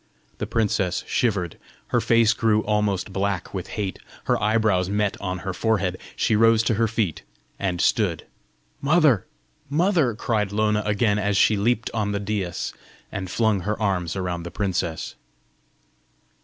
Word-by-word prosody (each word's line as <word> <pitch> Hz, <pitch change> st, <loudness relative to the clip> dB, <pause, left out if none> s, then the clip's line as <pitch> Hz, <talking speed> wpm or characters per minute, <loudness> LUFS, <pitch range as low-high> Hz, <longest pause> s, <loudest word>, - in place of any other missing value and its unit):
The -, -, -2 dB
princess 100 Hz, -5 st, 0 dB
shivered; 95 Hz, -8 st, -1 dB, 0.3 s
her -, -, +2 dB
face 115 Hz, -1 st, +4 dB
grew 110 Hz, -2 st, +2 dB
almost 105 Hz, -2 st, 0 dB
black 100 Hz, -2 st, -2 dB
with 95 Hz, -2 st, -4 dB
hate, 100 Hz, -3 st, -3 dB, 0.2 s
her -, -, +1 dB
eyebrows 105 Hz, -4 st, +2 dB
met 105 Hz, 0 st, 0 dB
on 95 Hz, -2 st, -2 dB
her 95 Hz, -, -2 dB
forehead. 95 Hz, -2 st, 0 dB, 0.2 s
She 110 Hz, -, +2 dB
rose 115 Hz, 0 st, +5 dB
to 115 Hz, -, +1 dB
her 115 Hz, +2 st, +2 dB
feet, 105 Hz, -7 st, -1 dB, 0.4 s
and 90 Hz, -3 st, -1 dB
stood. 90 Hz, -, +1 dB, 0.6 s
"Mother! 145 Hz, -, +3 dB, 0.4 s
mother!" 155 Hz, -, +2 dB
cried 105 Hz, -3 st, -1 dB
Lona 105 Hz, 0 st, +1 dB
again, 105 Hz, 0 st, +2 dB
as 100 Hz, -1 st, +1 dB
she 110 Hz, -, +5 dB
leaped 115 Hz, +3 st, 0 dB
on 105 Hz, -2 st, -1 dB
the 100 Hz, -, -1 dB
daïs, 100 Hz, -4 st, -3 dB, 0.4 s
and 95 Hz, -, -4 dB
flung 110 Hz, -1 st, +2 dB
her 105 Hz, +4 st, -3 dB
arms 95 Hz, -5 st, 0 dB
around 90 Hz, -2 st, -2 dB
the 85 Hz, -, -6 dB
princess. 90 Hz, -4 st, -2 dB
105 Hz, 150 wpm, -24 LUFS, 95-110 Hz, 0.6 s, rose